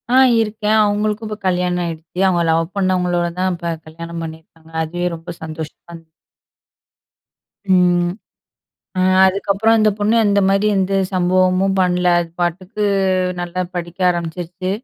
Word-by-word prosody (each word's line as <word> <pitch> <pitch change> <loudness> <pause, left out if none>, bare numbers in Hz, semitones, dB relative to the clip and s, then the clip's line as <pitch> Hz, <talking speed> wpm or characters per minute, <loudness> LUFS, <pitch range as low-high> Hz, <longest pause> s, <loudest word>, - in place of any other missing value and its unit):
ஆ - - +6 0.2
இருக்கேன். 215 0 0
அவுங்களுக்கும் 210 +1 -1
இப்ப 210 0 -5
கல்யாணம் 180 -1 0
ஆயிடுச்சு. 165 +1 -7
அவுங்க 175 -2 +2
லவ் 165 +2 0
பண்ணவங்களோட 180 -2 +1
தான் 185 0 +1
இப்ப 170 -1 -3
கல்யாணம் 165 +1 -7
பண்ணியிருக்காங்க. 160 0 -11
அதுவே 175 +3 -3
ரொம்ப 165 +1 -9
சந்தோஷமா 160 +1 -8
இன் 165 -1 -20 1.7
ம். 175 -1 +3 1.2
அதுக்கப்புறம் 200 +3 +2
அந்த 215 0 +4
பொண்ணு 210 +2 +1
அந்த 200 0 +3
மாதிரி 195 +2 +2
எந்த 195 0 0 0.2
சம்பவமும் 185 +1 +2
பண்ணல. 180 -1 +1
அது 170 -1 -5
பாட்டுக்கு 185 +5 -2 0.6
நல்லா 175 +1 -3
படிக்க 175 +1 -6
ஆரம்பிச்சுருச்சு. 175 +2 -4
180 Hz, 125 wpm, -18 LUFS, 170-195 Hz, 1.7 s, ஆ